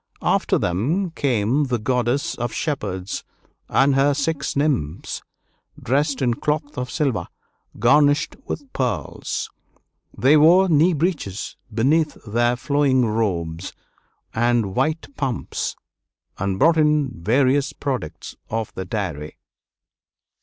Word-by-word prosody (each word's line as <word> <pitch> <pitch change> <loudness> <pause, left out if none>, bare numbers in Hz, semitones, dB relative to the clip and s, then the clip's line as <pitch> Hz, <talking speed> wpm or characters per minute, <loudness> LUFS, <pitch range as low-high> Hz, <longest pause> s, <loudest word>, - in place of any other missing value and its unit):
After - - +2
them 150 - 0
came 130 -1 +1
the 125 -2 0
Goddess 125 +3 0
of 120 -1 -3
Shepherds 105 - -3 0.5
and 135 +1 +4
her 140 +1 +3
six 140 0 -1
nymphs, 135 - -1 0.6
dressed 140 +2 0
in 120 -2 +2
cloth 150 +3 -2
of 125 -2 -3
silver, 130 - -1 0.5
garnished 145 +1 +3
with 275 -2 -6
pearls. 125 -2 -3 0.7
They 140 +4 +5
wore 175 +5 +6
knee 165 +3 +4
breeches 150 - -2 0.2
beneath 150 +8 +2
their 120 +3 +1
flowing 135 0 +2
robes, 95 -6 -2 0.6
and 115 -3 +1
white 155 +1 0
pumps, 135 -5 -2 0.6
and 100 -1 -1
brought 165 +9 +4
in 150 -3 +3
various 135 +6 +2
products 130 - -5
of 110 -1 -3
the 95 - -5
dairy. 85 -7 -4
130 Hz, 110 wpm, -22 LUFS, 110-150 Hz, 0.7 s, wore